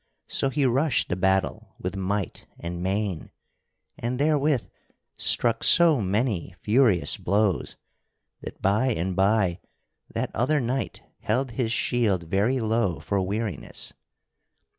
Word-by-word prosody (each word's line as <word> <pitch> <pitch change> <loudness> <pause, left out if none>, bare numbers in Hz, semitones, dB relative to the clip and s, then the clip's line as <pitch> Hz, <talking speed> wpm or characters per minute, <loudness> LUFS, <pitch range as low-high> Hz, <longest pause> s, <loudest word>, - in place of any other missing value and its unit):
So 135 - 0
he 140 +1 0
rushed 135 +3 +2
the - - 0
battle 95 +3 0
with 90 +1 -4
might 95 0 -3
and 85 0 -5
main, 95 -2 -2 0.7
and 120 +2 -2
therewith 145 -2 +2 0.5
struck 120 -2 +1
so 165 -7 +6
many 100 -2 -1
furious 110 -5 +3
blows 100 -1 0 0.6
that - - -9
by 105 +7 +2
and 95 -6 -1
by 95 -2 +2 0.5
that - - -2
other 145 +7 +2
knight 130 +1 -3 0.2
held 120 +4 0
his 115 0 -1
shield 115 -6 +1
very 100 +10 +1
low 110 -6 0
for 100 -1 -1
weariness. 100 -3 -3
110 Hz, 120 wpm, -25 LUFS, 95-125 Hz, 0.7 s, so